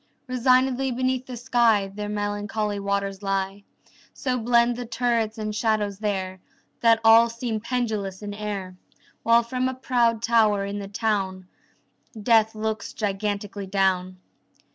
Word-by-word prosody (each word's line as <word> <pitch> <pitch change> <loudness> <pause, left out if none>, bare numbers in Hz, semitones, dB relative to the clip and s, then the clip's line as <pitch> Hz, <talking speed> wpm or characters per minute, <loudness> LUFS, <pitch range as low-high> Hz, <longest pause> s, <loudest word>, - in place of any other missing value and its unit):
Resignedly 255 +1 +2
beneath 255 +1 -1
the 250 -2 -6
sky 235 -4 +2
The 205 0 -5
melancholy 205 0 -2
waters 200 0 -2
lie. 195 0 -2 0.5
So 255 -2 -1
blend 235 +1 +3
the 245 -1 -6
turrets 230 -2 0
and 215 -1 -3
shadows 210 -3 0
there 190 -3 -2 0.4
That 230 -1 +4
all 225 +1 +7
seem 230 -1 -3
pendulous 215 -5 -3
in 205 0 -5
air, 200 -3 -5 0.4
While 230 +1 +4
from 255 +2 -1
a 260 - -5
proud 235 -3 +1
tower 215 -4 +3
in 200 +1 -4
the 200 - -6
town 195 -3 -2 0.7
Death 220 0 +3
looks 220 -1 -3
gigantically 205 -1 -3
down. 185 -1 0
215 Hz, 135 wpm, -24 LUFS, 200-235 Hz, 0.7 s, all